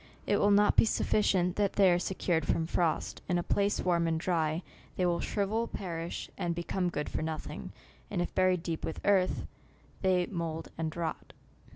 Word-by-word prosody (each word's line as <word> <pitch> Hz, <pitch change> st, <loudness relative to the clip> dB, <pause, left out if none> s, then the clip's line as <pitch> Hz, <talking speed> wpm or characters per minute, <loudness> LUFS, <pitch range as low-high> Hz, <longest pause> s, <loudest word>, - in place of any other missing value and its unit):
It 205 Hz, -, +2 dB
will 205 Hz, -, +3 dB
not 205 Hz, 0 st, +4 dB
be -, -, +7 dB
sufficient 185 Hz, -5 st, +2 dB
that 200 Hz, -1 st, +1 dB
they 195 Hz, -3 st, +5 dB
are 175 Hz, -, +3 dB
secured 175 Hz, -3 st, 0 dB
from 165 Hz, -, +1 dB
frost; 170 Hz, -1 st, -1 dB
in 180 Hz, -, +2 dB
a 175 Hz, -, 0 dB
place 200 Hz, +3 st, +1 dB
warm 170 Hz, -2 st, +2 dB
and 160 Hz, -1 st, 0 dB
dry, 165 Hz, -1 st, 0 dB, 0.3 s
they 185 Hz, -, +1 dB
will 170 Hz, -1 st, +1 dB
shrivel, 215 Hz, +5 st, -1 dB
perish, 170 Hz, -5 st, -5 dB
and 170 Hz, -1 st, -1 dB
become 175 Hz, +2 st, -1 dB
good 150 Hz, -3 st, -3 dB
for -, -, -3 dB
nothing, 155 Hz, 0 st, -5 dB, 0.4 s
and 195 Hz, -, -2 dB
if 175 Hz, -, -2 dB
buried 185 Hz, -2 st, +2 dB
deep 165 Hz, -3 st, -3 dB
with 160 Hz, -, -3 dB
earth, 195 Hz, -2 st, +2 dB, 0.6 s
they 185 Hz, -2 st, +3 dB
mould 165 Hz, -3 st, -4 dB
and 160 Hz, -1 st, -3 dB
rot. 165 Hz, -2 st, -4 dB
175 Hz, 185 wpm, -31 LUFS, 165-190 Hz, 0.6 s, be